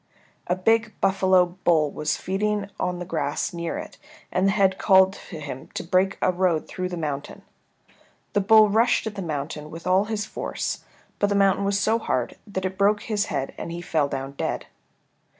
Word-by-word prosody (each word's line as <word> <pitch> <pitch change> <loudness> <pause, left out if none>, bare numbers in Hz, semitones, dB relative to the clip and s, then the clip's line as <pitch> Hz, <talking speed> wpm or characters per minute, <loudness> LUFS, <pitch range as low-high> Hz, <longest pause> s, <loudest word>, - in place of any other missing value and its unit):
A 180 - +2
big 225 +4 +1
buffalo 190 -1 +4 0.2
bull 155 -4 +3
was 150 - -1
feeding 200 +1 -1
on 180 0 -1
the 175 - -5
grass 180 - -2
near 170 -1 -3
it, - - -8 0.3
and 185 +2 +2
the - - +4
head 195 -2 +2
called 190 -1 +5 0.2
to 165 - -7
him 140 -3 -7
to - - -3
break 185 +2 +1
a - - +4
road 175 -3 +1
through 185 0 -4
the 175 - -5
mountain. 150 -3 -4 0.9
The 205 - +3
bull 215 +2 +7
rushed 225 +4 +2
at 220 - -3
the 200 - -5
mountain 150 -2 -4
with 165 +2 -9
all 185 +2 +3
his 210 -1 -2
force, - - -4 0.4
but 205 - +3
the 205 - 0
mountain 195 0 +3
was 200 0 +1
so 220 +3 +2
hard 130 - -1
that 190 -2 -3
it 185 +1 -4
broke 205 +1 +3
his 210 -2 0
head 135 - -3
and - - -5
he 170 - -5
fell 160 -4 0
down 135 -1 -4
dead. 140 - -3
185 Hz, 195 wpm, -24 LUFS, 165-200 Hz, 0.9 s, bull